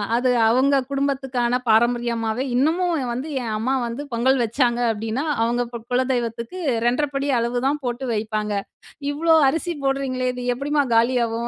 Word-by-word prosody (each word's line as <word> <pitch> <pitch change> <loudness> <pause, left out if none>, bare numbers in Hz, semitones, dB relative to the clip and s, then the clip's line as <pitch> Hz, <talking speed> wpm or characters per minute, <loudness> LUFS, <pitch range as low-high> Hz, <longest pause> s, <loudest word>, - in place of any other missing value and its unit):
அது 250 +2 +2 0.2
அவங்க 260 +4 +3
குடும்பத்துக்கான 265 -3 0
பாரம்பரியமாவே, 235 +1 +1
இன்னமும் 320 +2 +1
வந்து 255 +5 -4
என் 230 -2 -4
அம்மா 240 +5 -1
வந்து 235 +4 -5
பொங்கல் 260 +3 +2
வச்சாங்க 240 +1 +1
அப்படின்னா, 225 +5 -3 0.2
அவங்க 235 +1 +1
பு - - -3
குலதெய்வத்துக்கு 245 +1 -1 0.3
2.5 275 +3 0
அளவுதான் 245 +5 0
போட்டு 245 +1 -3
வைப்பாங்க, 215 -1 -2 0.6
"இவ்வளோ 320 +3 +3
அரிசி 330 +4 -2
போடுறீங்களே 270 -2 -1
இது 250 0 -6
எப்படிம்மா 285 +3 0
காலியாகும்? 235 0 +1
250 Hz, 130 wpm, -22 LUFS, 235-275 Hz, 0.6 s, அவங்க